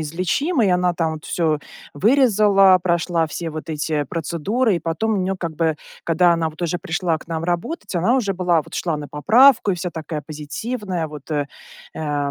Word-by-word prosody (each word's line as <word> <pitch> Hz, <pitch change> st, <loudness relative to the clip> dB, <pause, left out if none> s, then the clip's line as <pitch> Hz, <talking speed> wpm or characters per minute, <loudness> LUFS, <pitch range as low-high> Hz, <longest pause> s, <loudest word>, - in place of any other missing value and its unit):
излечимый. 185 Hz, -, 0 dB
Она 180 Hz, 0 st, +2 dB
там 165 Hz, -2 st, -1 dB
вот 155 Hz, -, -10 dB
всё 160 Hz, -4 st, 0 dB, 0.4 s
вырезала, 205 Hz, -, +5 dB
прошла 170 Hz, -1 st, +1 dB
все 165 Hz, +1 st, -5 dB
вот 155 Hz, +1 st, -7 dB
эти 150 Hz, -1 st, -1 dB
процедуры, 175 Hz, -, -1 dB
и -, -, -1 dB
потом 165 Hz, +8 st, -1 dB
у -, -, 0 dB
нее, 190 Hz, 0 st, -1 dB
как 170 Hz, -3 st, -4 dB
бы, 160 Hz, -2 st, +1 dB, 0.3 s
когда 170 Hz, +1 st, +4 dB
она 165 Hz, -1 st, 0 dB
вот 155 Hz, +2 st, -13 dB
уже 175 Hz, +1 st, -1 dB
пришла 170 Hz, -1 st, -1 dB
к -, -, -16 dB
нам 165 Hz, 0 st, -3 dB
работать, 180 Hz, -, -3 dB
она 185 Hz, +9 st, +2 dB
уже 210 Hz, -7 st, 0 dB
была, 175 Hz, -3 st, +2 dB
вот -, -, -13 dB
шла 165 Hz, -4 st, -1 dB
на 145 Hz, -1 st, -7 dB
поправку 220 Hz, -, +5 dB
и 185 Hz, -, +1 dB
вся 180 Hz, 0 st, -4 dB
такая 155 Hz, -1 st, -5 dB
позитивная, 175 Hz, -, -4 dB
вот 150 Hz, 0 st, -11 dB
э, 145 Hz, -2 st, 0 dB, 0.5 s
э, 145 Hz, -2 st, -2 dB
170 Hz, 190 wpm, -21 LUFS, 155-195 Hz, 0.5 s, вырезала